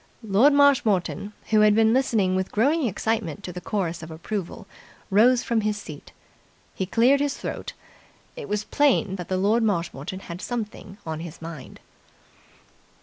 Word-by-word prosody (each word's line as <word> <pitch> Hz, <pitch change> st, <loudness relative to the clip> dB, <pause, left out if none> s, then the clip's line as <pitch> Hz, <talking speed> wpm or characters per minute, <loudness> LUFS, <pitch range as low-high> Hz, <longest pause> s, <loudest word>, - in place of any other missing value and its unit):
Lord 220 Hz, +7 st, +4 dB
Marshmoreton, 225 Hz, -9 st, +2 dB, 0.2 s
who 215 Hz, -, +5 dB
had 210 Hz, -1 st, +5 dB
been 220 Hz, 0 st, +4 dB
listening 225 Hz, -8 st, +2 dB
with 190 Hz, 0 st, -2 dB
growing 280 Hz, +6 st, +2 dB
excitement 210 Hz, -3 st, -2 dB
to 180 Hz, -, -6 dB
the 180 Hz, -, -7 dB
chorus 175 Hz, -6 st, -2 dB
of 160 Hz, -, -9 dB
approval, 170 Hz, +4 st, -5 dB, 0.5 s
rose 235 Hz, +5 st, +5 dB
from 230 Hz, -2 st, 0 dB
his 210 Hz, 0 st, -1 dB
seat. 155 Hz, -8 st, -10 dB, 0.6 s
He 190 Hz, -, -3 dB
cleared 245 Hz, +7 st, +4 dB
his 285 Hz, -1 st, -1 dB
throat. -, -, -6 dB, 0.6 s
It -, -, -8 dB
was 210 Hz, 0 st, -1 dB
plain 265 Hz, -8 st, +2 dB
that 175 Hz, -, -7 dB
Lord 200 Hz, +5 st, +2 dB
Marshmoreton 180 Hz, -4 st, -2 dB
had 175 Hz, 0 st, -8 dB
something 220 Hz, -4 st, -5 dB
on 160 Hz, -1 st, -4 dB
his 170 Hz, -1 st, -8 dB
mind. 165 Hz, -4 st, -9 dB
210 Hz, 150 wpm, -24 LUFS, 180-230 Hz, 0.6 s, who